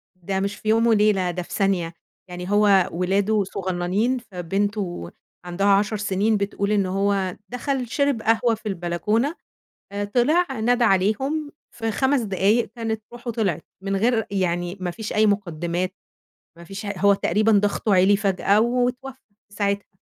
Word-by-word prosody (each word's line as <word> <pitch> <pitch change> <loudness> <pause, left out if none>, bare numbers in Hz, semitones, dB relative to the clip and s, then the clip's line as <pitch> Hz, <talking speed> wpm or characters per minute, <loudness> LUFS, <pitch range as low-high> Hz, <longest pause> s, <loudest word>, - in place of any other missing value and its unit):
ده 190 +2 -3
مش 200 +1 -2
في 215 - -5
يوم 225 +1 +4
وليلة، 205 -5 +3
ده 180 - -4
في - - -11
ثانية. 185 -4 0 0.4
يعني 180 +2 -6
هو 205 -3 +4
ولاده 195 +4 +1
صغننين 190 +6 -1
فبنته 195 - -3 0.3
عندها 180 +3 -1
10 205 +2 +3
سنين 205 +1 +1
بتقول 200 +1 -2
إن 200 -2 +2
هو 195 -1 0
دخل 250 0 -2
شرب 280 -2 0
قهوة 225 +1 +2
في 220 - -21
البلكونة 205 - -1 0.6
آآ 205 0 -3
طلع 265 +12 +2 0.2
نادى 245 +1 +3
عليهم، 265 +11 +1 0.2
في 225 -1 -3
5 265 +4 +1
دقايق 205 +3 +1
كانت 225 -2 -3
روحه 240 0 -5
طلعت، 205 -8 -1 0.2
من 195 0 -1
غير 225 +2 +1
يعني 175 -1 -1
ما 180 - -2
فيش 210 +5 -6
أي 215 +1 +4
مقدمات، 180 -2 -1 0.6
ما 170 - -12
فيش 195 +4 -7
ه 200 - -2
هو 200 +2 +5
تقريبًا 210 +4 +1
ضغطه 205 0 +2
عِلي 190 +2 +5
فجأة، 200 +1 +2
واتوفى 250 +2 0 0.4
في 205 - -18
ساعتها. 200 -1 -2
200 Hz, 155 wpm, -23 LUFS, 190-225 Hz, 0.6 s, هو